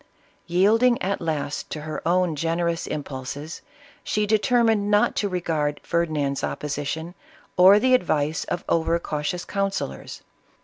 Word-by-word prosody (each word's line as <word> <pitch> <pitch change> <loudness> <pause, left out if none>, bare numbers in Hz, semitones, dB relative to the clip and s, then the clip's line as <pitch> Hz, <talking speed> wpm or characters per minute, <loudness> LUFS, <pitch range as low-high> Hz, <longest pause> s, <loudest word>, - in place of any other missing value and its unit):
Yielding 220 +8 +3
at 200 +2 -2
last 155 -3 -3
to 155 - -5
her 155 0 -5
own 180 -2 +2
generous 165 +2 -1
impulses, 145 +2 -6 0.4
she 210 0 0
determined 220 -1 +2
not 210 0 +3
to 205 - 0
regard 160 -5 -1
Ferdinand's 150 -5 -1
opposition, 150 +3 -3 0.4
or 190 +3 +8
the 255 +4 +3
advice 155 -9 +1
of 175 - -4
over 165 0 +2
cautious 170 +2 -3
councillors. 195 - -3
170 Hz, 125 wpm, -24 LUFS, 150-200 Hz, 0.4 s, or